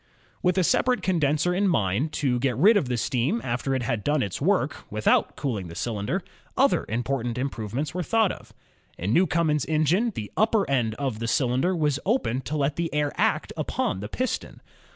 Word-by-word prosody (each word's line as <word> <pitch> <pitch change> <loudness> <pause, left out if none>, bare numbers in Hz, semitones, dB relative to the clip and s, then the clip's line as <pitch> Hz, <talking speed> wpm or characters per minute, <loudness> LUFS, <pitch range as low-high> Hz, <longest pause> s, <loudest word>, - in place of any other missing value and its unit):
" - - -34
With 180 +1 +1
a 185 - +4
separate 250 +8 +2
condenser 160 -1 +1
in 200 +3 +1
mind, 125 - +1
to 130 -6 0
get 125 -3 0
rid 205 - +6
of 155 -11 +1
the 125 - 0
steam 135 - 0
after 125 +3 -1
it 130 - -1
had 115 -4 -2
done 145 -2 +1
its 100 - -4
work, - - +1
without - - +2
cooling 110 - -3
the 85 - -9
cylinder, 105 -2 -2 0.3
other - - +3
important 120 +1 -2
improvements 130 +2 -3
were 180 - -2
thought 220 +2 +2
of. - - -11 0.5
In 95 +6 -1
Newcomen's 160 -4 +2
engine, 160 +9 +2
the 105 - -5
upper 215 -1 +2
end 120 -5 0
of 130 -5 -3
the 115 - -3
cyUnder 130 +9 +1
was 150 -3 +1
open 185 - 0
to 155 +3 -4
let 140 0 0
the 170 -1 -1
air 150 -1 0
act - - 0
upon - - -2
the 105 +2 -6
piston. 255 - -3
140 Hz, 195 wpm, -25 LUFS, 120-170 Hz, 0.5 s, rid